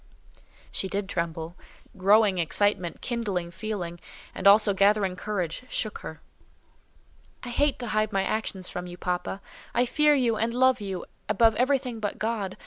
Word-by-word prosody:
She 190 - -3
did 200 0 -2
tremble: 170 -2 -3 0.4
growing 200 0 +4
excitement, 180 +1 0
kindling 200 -8 -2
feeling, 185 -2 -5 0.3
and 190 - 0
also 205 0 +7
gathering 200 -1 +3
courage, 185 -3 -3
shook 215 -3 -2
her. 160 - -9 1.2
"I 250 - -6
hate 285 +3 +1
to 245 - -5
hide 215 0 +1
my 195 -1 +1
actions 195 -2 -2
from 180 0 -5
you, 175 0 -9
papa. 180 +2 -3 0.3
I 245 +1 +3
fear 300 +3 +4
you 240 -5 +2
and 230 +2 -1
love 260 -1 +4
you 195 -3 -4 0.2
above 225 +2 +4
everything 250 0 0
but 205 -2 -3
God. 215 -4 -2
205 Hz, 150 wpm, -27 LUFS, 185-230 Hz, 1.2 s, also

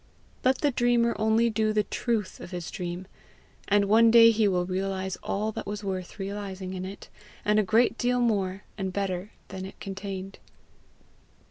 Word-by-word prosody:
Let 260 +1 +2
the 290 - +3
dreamer 240 -1 +2
only 220 +2 +3
do 215 0 +1
the 210 0 +2
truth 215 0 -2
of - - -9
his 175 -2 -5
dream, 180 -1 -5 0.6
and 205 0 +4
one 225 +3 +6
day 230 0 +8
he 220 -1 +2
will 180 -2 +1
realize 190 0 -2
all 215 +2 -1
that - - -6
was 210 0 -4
worth 185 -1 -4
realizing 195 -2 -5
in 185 0 -4
it 195 +2 -9 0.4
and 210 +1 +4
a - - +3
great 230 +3 +3
deal 245 0 +2
more 200 -5 0 0.2
and 190 -1 -2
better 190 0 -2 0.2
than 190 -1 -6
it 190 - -9
contained. 195 0 -6
200 Hz, 170 wpm, -27 LUFS, 190-220 Hz, 0.6 s, day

